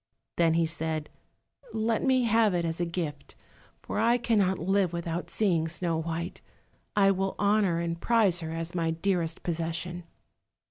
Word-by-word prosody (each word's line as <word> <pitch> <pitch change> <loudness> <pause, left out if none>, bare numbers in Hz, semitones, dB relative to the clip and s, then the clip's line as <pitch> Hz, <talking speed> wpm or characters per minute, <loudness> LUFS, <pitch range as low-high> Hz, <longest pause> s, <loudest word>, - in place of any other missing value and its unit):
Then 165 -1 +3
he 165 0 +3
said, 160 -1 -2 0.6
"Let 220 +1 0
me 260 -2 +3
have 225 -4 +3
it 170 -1 0
as 165 0 -3
a 175 - 0
gift, 165 -4 -5 0.5
for - - -3
I 235 +2 +4
cannot 205 -6 +2
live 190 0 +1
without 170 0 -3
seeing 170 -7 +1
Snow 170 0 -1
white. 165 +1 -4 0.5
I 195 -1 +5
will 195 0 -1
honour 200 -4 +2
and 170 0 -3
prize 215 -7 +3
her 160 -2 -5
as 165 +1 -4
my 165 -2 0
dearest 165 -1 -1
possession." 170 +1 -3
175 Hz, 155 wpm, -28 LUFS, 165-200 Hz, 0.6 s, I